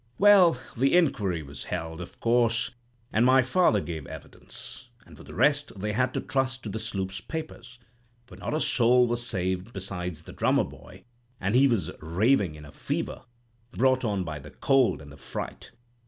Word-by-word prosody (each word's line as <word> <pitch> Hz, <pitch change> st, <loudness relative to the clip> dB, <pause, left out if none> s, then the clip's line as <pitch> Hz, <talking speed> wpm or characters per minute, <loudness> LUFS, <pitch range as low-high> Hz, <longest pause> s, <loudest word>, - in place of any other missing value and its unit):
"Well, 195 Hz, -7 st, +7 dB, 0.2 s
the 135 Hz, +8 st, +3 dB
inquiry 100 Hz, -, +1 dB
was 70 Hz, 0 st, -9 dB
held, 80 Hz, +1 st, -4 dB
of 90 Hz, -, -10 dB
course, 115 Hz, 0 st, +2 dB, 0.4 s
and 110 Hz, -, +4 dB
my 130 Hz, +1 st, +6 dB
father 170 Hz, -, +3 dB
gave 80 Hz, -7 st, -6 dB
evidence, -, -, -10 dB, 0.2 s
and -, -, -15 dB
for -, -, -13 dB
the -, -, -11 dB
rest 145 Hz, -7 st, +2 dB
they 105 Hz, +2 st, -2 dB
had 125 Hz, +3 st, +1 dB
to -, -, 0 dB
trust 130 Hz, -1 st, -1 dB
to 110 Hz, -, -5 dB
the 110 Hz, +3 st, -4 dB
sloop's 100 Hz, -3 st, -4 dB
papers, 155 Hz, -6 st, -7 dB, 0.5 s
for -, -, -14 dB
not -, -, -3 dB
a 155 Hz, -, 0 dB
soul 125 Hz, -1 st, +4 dB
was 120 Hz, 0 st, -1 dB
saved 95 Hz, -1 st, -2 dB
besides 90 Hz, -4 st, -5 dB
the -, -, -11 dB
drummer -, -, +2 dB
boy, -, -, -12 dB, 0.4 s
and 100 Hz, +2 st, -1 dB
he 135 Hz, +3 st, +6 dB
was 115 Hz, -7 st, 0 dB
raving 90 Hz, -, +2 dB
in 75 Hz, 0 st, -11 dB
a 75 Hz, -, -12 dB
fever, -, -, -4 dB, 0.5 s
brought 130 Hz, +1 st, +2 dB
on 100 Hz, -5 st, 0 dB
by 80 Hz, -3 st, -5 dB
the 65 Hz, -, -11 dB
cold 125 Hz, -, +2 dB
and 70 Hz, -, -12 dB
the 70 Hz, -, -13 dB
fright. -, -, -7 dB
115 Hz, 185 wpm, -27 LUFS, 90-130 Hz, 0.5 s, Well